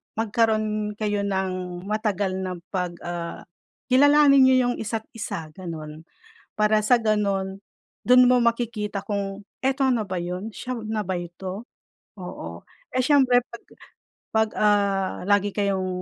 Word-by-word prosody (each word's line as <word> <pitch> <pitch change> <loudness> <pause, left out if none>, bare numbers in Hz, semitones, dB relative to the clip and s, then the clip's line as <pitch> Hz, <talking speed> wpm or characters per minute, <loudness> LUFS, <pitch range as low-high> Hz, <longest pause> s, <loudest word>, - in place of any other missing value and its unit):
magkaroon 215 -1 0
kayo 210 -1 -1
ng 185 -2 -3
matagal 205 -2 -1
na 185 -1 -3 0.2
pag, 180 -2 -2
ah, 175 -1 -5 0.5
kilalanin 285 +1 +6
niyo 260 - +5 0.2
yung - - -3
isa't 220 0 -3
isa 165 -8 -6
ganun. 160 -2 -8 0.5
Para 215 0 +3
sa 240 +3 +4
ganun, 200 -3 -1 0.4
dun 250 0 +7
mo 250 - +5
makikita 230 -3 -1
kung 200 -1 -4 0.2
eto 270 0 +2
na 240 -4 +1
ba 185 -2 -3
yun? 180 +5 -5
Siya 255 +4 -5
na 215 0 -2
ba 185 - -1
ito? 185 +4 -6 0.5
Oo. 85 - -8 0.2
Eh, - - -2
siyempre 260 -3 +5
pag 235 - -11 0.7
pag, 220 0 +2
ah, 200 -2 +1
lagi 205 0 +3
kayong 195 -2 -1
205 Hz, 135 wpm, -24 LUFS, 185-225 Hz, 0.7 s, dun